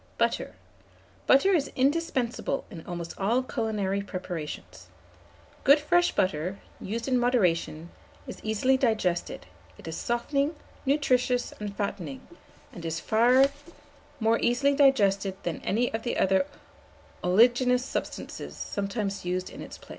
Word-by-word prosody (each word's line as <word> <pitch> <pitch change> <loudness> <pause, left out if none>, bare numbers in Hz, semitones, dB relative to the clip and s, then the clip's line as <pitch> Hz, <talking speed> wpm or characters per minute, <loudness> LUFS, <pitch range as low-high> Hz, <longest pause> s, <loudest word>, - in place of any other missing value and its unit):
BUTTER. - - 0 0.7
Butter 275 +9 +5
is 300 -6 +1
indispensable 270 -2 0
in 165 -5 -8
almost 170 -1 -5
all 230 +6 +2
culinary 215 -5 -1
preparations. 165 - -6 0.8
Good 280 +3 +7
fresh 350 +4 +3
butter, 185 +1 0 0.2
used 230 +5 -4
in 255 -2 +2
moderation, 175 -9 +1 0.3
is - - -8
easily 220 +5 +2
digested; 215 - 0 0.3
it - - -12
is 160 - -4
softening, 275 +6 -1 0.3
nutritious, 255 -3 +2
and 205 -1 -6
fattening, 175 -9 -4 0.5
and 170 - -9
is 165 0 -2
far 245 +4 +5 0.7
more 225 0 +2
easily 275 +4 +2
digested 200 -9 +3
than 170 -2 -3
any 235 +4 0
other 225 +2 -2
of 190 - +3
the 190 -1 +3 0.8
oleaginous 245 +6 +4
substances - - -5
sometimes 200 0 -3
used 180 +1 -2
in - - -9
its - - -9
place. - - -18
220 Hz, 125 wpm, -27 LUFS, 185-255 Hz, 0.8 s, Good